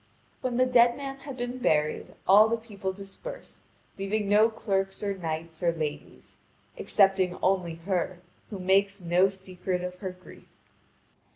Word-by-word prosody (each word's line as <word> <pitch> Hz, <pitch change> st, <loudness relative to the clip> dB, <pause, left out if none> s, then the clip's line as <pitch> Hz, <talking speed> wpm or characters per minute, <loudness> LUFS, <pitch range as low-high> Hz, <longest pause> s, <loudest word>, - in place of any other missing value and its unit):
When 255 Hz, -2 st, -1 dB
the 255 Hz, -, +5 dB
dead 240 Hz, -1 st, +5 dB
man 275 Hz, -1 st, -5 dB
had 275 Hz, -1 st, -9 dB
been 245 Hz, +1 st, -4 dB
buried, 150 Hz, -9 st, 0 dB
all 210 Hz, +3 st, +7 dB
the 230 Hz, -, +1 dB
people 205 Hz, -4 st, -5 dB
dispersed, 200 Hz, -, -9 dB, 0.4 s
leaving 200 Hz, +1 st, -1 dB
no 210 Hz, +3 st, +5 dB
clerks 195 Hz, -3 st, -2 dB
or 200 Hz, -1 st, -1 dB
knights 160 Hz, -2 st, -5 dB
or 170 Hz, -1 st, +3 dB
ladies, 155 Hz, -3 st, -6 dB, 0.4 s
excepting 195 Hz, -3 st, +3 dB
only 180 Hz, -3 st, +1 dB
her 185 Hz, -1 st, -1 dB, 0.3 s
who 205 Hz, -, -6 dB
makes 195 Hz, +2 st, +2 dB
no 180 Hz, +2 st, +3 dB
secret 185 Hz, -1 st, -4 dB
of 180 Hz, 0 st, -6 dB
her 190 Hz, -, -4 dB
grief. 180 Hz, 0 st, -14 dB
195 Hz, 150 wpm, -28 LUFS, 180-220 Hz, 0.4 s, all